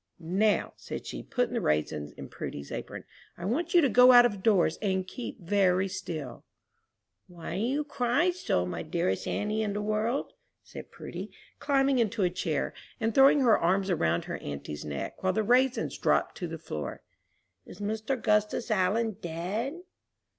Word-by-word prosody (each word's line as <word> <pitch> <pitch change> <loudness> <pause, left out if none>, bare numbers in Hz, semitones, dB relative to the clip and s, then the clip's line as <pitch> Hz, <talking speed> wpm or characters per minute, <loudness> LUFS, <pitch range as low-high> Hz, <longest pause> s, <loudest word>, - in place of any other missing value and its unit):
"Now," 190 +6 +1
said - - -7
she, - - -6
putting 245 -1 -1
the 235 - 0
raisins 75 - -1
in - - -9
Prudy's 70 0 -7
apron, - - -6 0.3
"I 175 - -6
want 315 - -1
you 345 - +8
to 285 - +4
go 250 +3 +7
out 245 0 +9
of 205 -5 -1
doors 185 -6 +3
and 190 -3 0
keep 235 +4 -7
very 190 0 +2
still." 170 -9 -6 0.8
"Why 175 -2 -7
do - - -1
you 270 +6 0
cry 280 +4 +1
so, 350 - -1
my 90 - -4
dearest 155 - -1
auntie 210 +1 -1
in 210 -2 -1
the 205 - -2
world?" 215 +5 -1 0.3
said - - -10
Prudy, - - -7 0.3
climbing 275 -2 +2
into 215 -3 +1
a 180 - +2
chair, 165 -5 -2 0.3
and 225 0 0
throwing 275 +3 +6
her 235 -4 +5
arms 190 +3 +1
around 85 - +1
her - - -4
auntie's 70 +1 -6
neck, 70 -2 -5
while 185 0 +1
the 220 - +1
raisins 250 +4 +2
dropped - - +1
to 175 - -3
the 165 0 -6
floor; 75 - -6 0.6
"is - - -12
Mr. 220 +5 -2
'Gustus 210 +1 +1
Allen 215 +2 +1
dead?" 200 - -3
205 Hz, 170 wpm, -29 LUFS, 175-245 Hz, 0.8 s, out